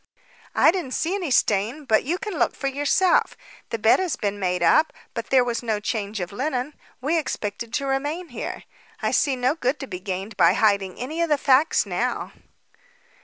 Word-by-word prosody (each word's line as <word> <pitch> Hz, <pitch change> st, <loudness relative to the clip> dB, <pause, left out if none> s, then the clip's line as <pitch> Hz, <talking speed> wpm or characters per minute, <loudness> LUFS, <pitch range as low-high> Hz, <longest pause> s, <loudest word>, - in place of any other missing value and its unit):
"I -, -, +6 dB
didn't 340 Hz, -8 st, -3 dB
see 330 Hz, +4 st, -1 dB
any 375 Hz, -6 st, -2 dB
stain, 230 Hz, +4 st, +1 dB
but 220 Hz, -4 st, +3 dB
you 330 Hz, +7 st, -1 dB
can 415 Hz, +1 st, -5 dB
look -, -, +1 dB
for -, -, -7 dB
yourself. 290 Hz, +7 st, +2 dB, 0.3 s
The 230 Hz, -, -2 dB
bed 220 Hz, +1 st, +4 dB
has 365 Hz, -5 st, -1 dB
been 205 Hz, -1 st, -3 dB
made 180 Hz, -2 st, 0 dB
up, 315 Hz, -, +4 dB, 0.2 s
but 230 Hz, -1 st, -4 dB
there 260 Hz, -2 st, +4 dB
was 240 Hz, -1 st, -2 dB
no 220 Hz, -3 st, -1 dB
change 210 Hz, -1 st, -3 dB
of 180 Hz, -1 st, -4 dB
linen. 260 Hz, +4 st, -2 dB, 0.3 s
We 315 Hz, +5 st, +1 dB
expected 225 Hz, -5 st, -4 dB
to 280 Hz, -2 st, -1 dB
remain 290 Hz, +6 st, -2 dB
here; -, -, -6 dB, 0.4 s
I -, -, +1 dB
see 275 Hz, -3 st, +2 dB
no 250 Hz, +2 st, +1 dB
good 285 Hz, -3 st, -1 dB
to 270 Hz, -, -5 dB
be 180 Hz, -8 st, -6 dB
gained 195 Hz, +3 st, -5 dB
by 170 Hz, -1 st, +5 dB
hiding 200 Hz, -3 st, +2 dB
any 310 Hz, +7 st, -4 dB
of 335 Hz, -, +1 dB
the 295 Hz, -, +3 dB
facts 280 Hz, +3 st, +3 dB
now." -, -, -2 dB
255 Hz, 195 wpm, -24 LUFS, 210-300 Hz, 0.4 s, I